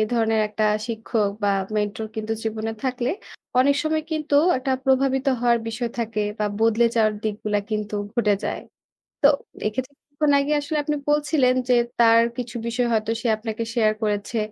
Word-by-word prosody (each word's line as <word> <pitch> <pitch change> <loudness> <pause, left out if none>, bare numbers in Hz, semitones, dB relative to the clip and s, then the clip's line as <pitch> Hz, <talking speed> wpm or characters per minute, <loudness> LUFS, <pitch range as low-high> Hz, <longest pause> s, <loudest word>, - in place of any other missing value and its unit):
ধরনের 225 -2 +2
একটা 215 0 -1 0.2
শিক্ষক 225 -2 -1
বা 200 - +3 0.3
মেন্টর 210 +1 -2
কিন্তু 220 0 -2
জীবনে 220 0 -2
থাকলে 250 -1 -1 0.5
অনেক 280 +2 +5
সময় 310 0 0
কিন্তু 305 -2 -1 0.2
একটা 265 +1 -1
প্রভাবিত 265 0 +2
হওয়ার 240 -1 +3
বিষয় 230 +1 -3
থাকে 225 -2 -2 0.2
বা 210 - 0 0.2
বদলে 225 +1 +4
যাওয়ার 215 -1 +3
দিকগুলা 210 -1 -1
কিন্তু 210 0 -2 0.2
ঘটে 210 -4 +3
যায়। - - -2 0.6
তো 280 - +7 0.4
এক্ষেত্রে 255 +6 -3
কিছুক্ষণ 290 0 -1
আগে 280 +2 -1
আসলে 295 +2 -3
আপনি 300 0 -1
বলছিলেন 295 -3 +3 0.2
যে 250 - +5 0.3
তার 230 0 +6 0.2
কিছু 240 -2 -5
বিষয় 240 +1 0
হয়তো 220 0 0
সে - - -1
আপনাকে 220 +1 -4
শেয়ার 220 -3 +3
করেছে। 210 +2 -1
230 Hz, 160 wpm, -23 LUFS, 215-265 Hz, 0.6 s, তো